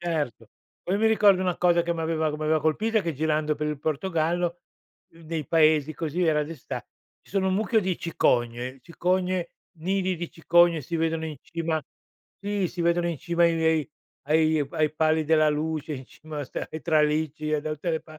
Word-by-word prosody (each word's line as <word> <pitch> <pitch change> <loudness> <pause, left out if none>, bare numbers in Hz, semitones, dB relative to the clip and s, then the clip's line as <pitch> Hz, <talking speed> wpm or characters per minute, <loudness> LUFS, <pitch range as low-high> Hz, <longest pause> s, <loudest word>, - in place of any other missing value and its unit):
Erto. 160 -9 -2 0.4
Poi 190 +3 -1
mi 220 - +3
ricordo 205 -4 +5
una 180 -2 0
cosa 175 -1 +3
che 170 0 -1
mi 165 - -4
aveva 160 -1 0
che 150 - -4
mi 155 - -6
aveva 155 0 +2
colpita, 215 +9 +1
che 165 - -2
girando 155 +1 0
per 150 +1 -2
il 150 -2 -3
Portogallo, 170 +2 -1 0.5
uhm, 165 - -17
dei 160 -3 -4
paesi, 155 -2 +3
così, 165 +4 -2
era 150 -2 +3
d'esta 150 -2 -6 0.4
ci - - -21
sono 190 -1 +1
un 185 - +1
mucchio 220 +2 +2
di 185 -3 -1
cicogne, 125 -5 0
cicogne, 180 +1 -1 0.3
nidi 185 +2 0
di 170 0 -5
cicogne 170 0 +3
si 165 +5 -4
vedono 160 0 0
in 155 -2 -5
cima 165 -1 -2 0.6
sì, 205 -2 -1
si 175 - -7
vedono 170 0 +2
in 170 - -2
cima 170 0 +1
ai 170 -1 +3
vei 160 -2 +1 0.3
ai 155 0 +2
pa - - -8
ai 155 -1 +2
pali 155 0 +2
della 155 0 +4
luce, 155 0 -2
in 130 -1 -8
cima 155 -1 -8
a - - -3
sta - - -5
ai 155 - -6
tralicci 155 -1 +1
e 150 - +2
da 155 - -4
tutte 155 +3 -3
le 160 - -1
pa 155 -1 -14
160 Hz, 205 wpm, -26 LUFS, 155-175 Hz, 0.6 s, ricordo